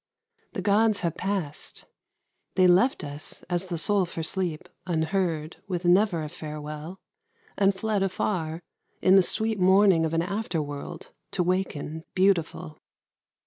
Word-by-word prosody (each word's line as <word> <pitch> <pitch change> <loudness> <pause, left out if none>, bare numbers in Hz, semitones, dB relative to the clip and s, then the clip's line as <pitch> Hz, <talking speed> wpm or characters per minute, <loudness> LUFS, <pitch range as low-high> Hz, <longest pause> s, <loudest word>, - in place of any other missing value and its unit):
The 190 - -4
gods 210 +1 +3
have 170 -2 -1
passed. 185 -6 -4 0.7
They 185 -1 +5
left 185 +8 +4
us, 145 0 -7
as 175 +1 0
the 175 -2 -3
soul 200 +3 +3
for 165 -1 -5
sleep, 175 -1 -2 0.2
unheard, 165 -1 -1
With 180 -2 -3
never 175 -2 +3
a - - -4
farewell, 150 +3 -7 0.6
and 195 -1 +3
fled 215 0 -1
afar, 175 -3 -2 0.4
In 185 - +6
the 195 - +8
sweet 220 +3 +1
morning 190 -2 +5
of 160 0 -1
an 165 - +2
after 200 -2 -2
world 145 +3 -6 0.2
To 180 - +1
waken 170 -4 -2
beautiful. 180 -4 +1
180 Hz, 140 wpm, -26 LUFS, 160-195 Hz, 0.7 s, the